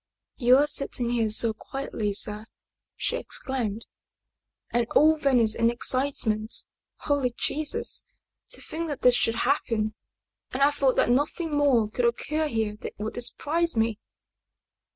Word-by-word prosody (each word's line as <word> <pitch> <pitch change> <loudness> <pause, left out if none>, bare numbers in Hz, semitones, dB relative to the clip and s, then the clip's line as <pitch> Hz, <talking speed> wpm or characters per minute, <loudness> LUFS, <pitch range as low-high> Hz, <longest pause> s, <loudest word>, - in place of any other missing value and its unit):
" - - -60
You 250 0 +5
are 290 - +4
sitting 255 -4 -1
here 230 -2 +1
so 220 +1 +6
quietly, 220 -3 -4
sir!" 210 +2 0 0.5
she - - -1
exclaimed. 230 - -3 0.9
"And 240 -1 0
all 315 +1 +6
Venice 250 -7 +2
in 230 +1 +2
excitement? 240 -3 -1 0.4
Holy 275 -5 0
Jesus! 305 0 -1 0.5
To - - -8
think 330 +1 -5
that 290 -4 -5
this 250 - +5
should 230 -1 +1
happen 225 -5 0 0.6
and 265 +2 0
I 285 - +5
thought 275 -3 +1
that - - +2
nothing 295 +4 0
more 270 -7 +3
could 240 +3 -2
occur 305 +6 -1
here 220 -5 -2
that - - -8
would 220 +3 -5
surprise 335 +7 -1
me 225 -1 0
245 Hz, 145 wpm, -26 LUFS, 225-285 Hz, 0.9 s, so